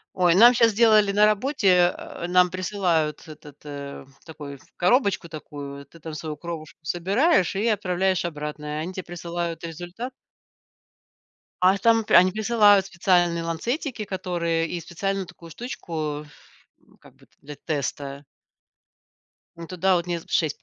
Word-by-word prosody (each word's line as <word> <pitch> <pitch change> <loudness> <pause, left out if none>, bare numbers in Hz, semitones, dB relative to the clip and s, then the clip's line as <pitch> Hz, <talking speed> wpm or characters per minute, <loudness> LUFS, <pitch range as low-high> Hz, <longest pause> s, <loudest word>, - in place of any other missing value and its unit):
Ой, 175 -2 +4
нам 240 +5 +8
щас 230 -1 +4
сделали 215 -2 +4
на 210 +1 +5
работе, 200 -6 +3
а, - - -7
нам 180 0 +4
присылают 180 -5 -1
этот, 150 -2 -13
э, 140 -1 -8 0.2
такой 145 -4 -9 0.2
коробочку 200 -3 +1
такую. 140 -2 -8
Ты 165 +5 -18
там 160 0 -8
свою 155 0 -5
кровушку 165 -2 -8
собираешь 190 - +1
и 215 +4 0
отправляешь 190 -3 0
обратно, 150 -2 -5
и - - -5 0.2
они 180 +3 -6
те 185 -1 -6
присылают 170 -1 -5
результат. 175 - -7 1.5
А 185 +2 +5
там 225 -1 +3
пе - - -3
они 185 +1 +7
присылают 210 -2 +4
специальные 175 -2 +1
ланцетики, 225 - -3
которые 170 -4 -2
и 175 - -3
специальную 195 +3 -3
такую 170 -1 -14
штучку, 160 - -5
ф 150 -1 -15 0.5
ну, - - -27
как - - -19
бы, - - -22
т - - -43
для 145 +1 -9
теста. 140 -1 -4 1.3
Ну, 170 0 -9
туда 185 +1 +1
вот 170 0 -1
не 170 -1 -2
з - - -16
6 155 -4 0
175 Hz, 150 wpm, -24 LUFS, 160-195 Hz, 1.5 s, нам